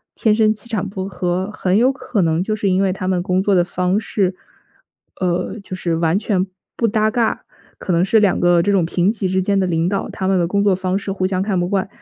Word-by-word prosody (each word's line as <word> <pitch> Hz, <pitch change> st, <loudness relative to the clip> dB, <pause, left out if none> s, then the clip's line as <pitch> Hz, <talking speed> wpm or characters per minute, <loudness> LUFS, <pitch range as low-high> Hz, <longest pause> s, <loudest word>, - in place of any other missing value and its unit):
天 215 Hz, -2 st, +2 dB
生 215 Hz, -1 st, +3 dB
气 220 Hz, +2 st, -11 dB
场 205 Hz, -4 st, -2 dB
不 190 Hz, -1 st, -5 dB
合， 185 Hz, 0 st, -2 dB
很 190 Hz, -2 st, 0 dB
有 250 Hz, +3 st, +4 dB
可 250 Hz, -6 st, -2 dB
能 165 Hz, +1 st, +1 dB
就 215 Hz, -, -2 dB
是 200 Hz, -2 st, -1 dB
因 185 Hz, +1 st, +2 dB
为 190 Hz, -, +2 dB
他 185 Hz, 0 st, -4 dB
们 180 Hz, -2 st, 0 dB
工 185 Hz, 0 st, +1 dB
作 200 Hz, 0 st, +1 dB
的 175 Hz, -, +4 dB
方 180 Hz, +2 st, -1 dB
式， 190 Hz, -4 st, -1 dB, 0.9 s
呃， 180 Hz, +3 st, -1 dB
就 185 Hz, -, -7 dB
是 170 Hz, -3 st, -1 dB
完 165 Hz, +2 st, +1 dB
全 195 Hz, -3 st, 0 dB, 0.3 s
不 230 Hz, -, +2 dB
搭 215 Hz, 0 st, +1 dB
嘎。 230 Hz, -1 st, -1 dB, 0.3 s
可 -, -, -4 dB
能 175 Hz, +1 st, +3 dB
是 220 Hz, +2 st, +4 dB
两 205 Hz, -3 st, +2 dB
个 175 Hz, -1 st, +4 dB
这 200 Hz, +3 st, +1 dB
种 185 Hz, -4 st, +2 dB
平 180 Hz, +4 st, +1 dB
级 200 Hz, -4 st, -2 dB
之 190 Hz, +1 st, 0 dB
间 195 Hz, +1 st, +1 dB
的 190 Hz, -, +1 dB
领 170 Hz, 0 st, 0 dB
导， 200 Hz, -1 st, -2 dB
他 190 Hz, -, -4 dB
们 190 Hz, -1 st, +2 dB
的 175 Hz, -, +2 dB
工 200 Hz, +3 st, 0 dB
作 200 Hz, -2 st, +3 dB
方 185 Hz, 0 st, -1 dB
式 200 Hz, 0 st, -4 dB
互 190 Hz, -1 st, -1 dB
相 185 Hz, -1 st, 0 dB
看 195 Hz, -2 st, 0 dB
不 175 Hz, -, 0 dB
惯， 195 Hz, 0 st, 0 dB
190 Hz, 275 characters per minute, -19 LUFS, 180-205 Hz, 0.9 s, 有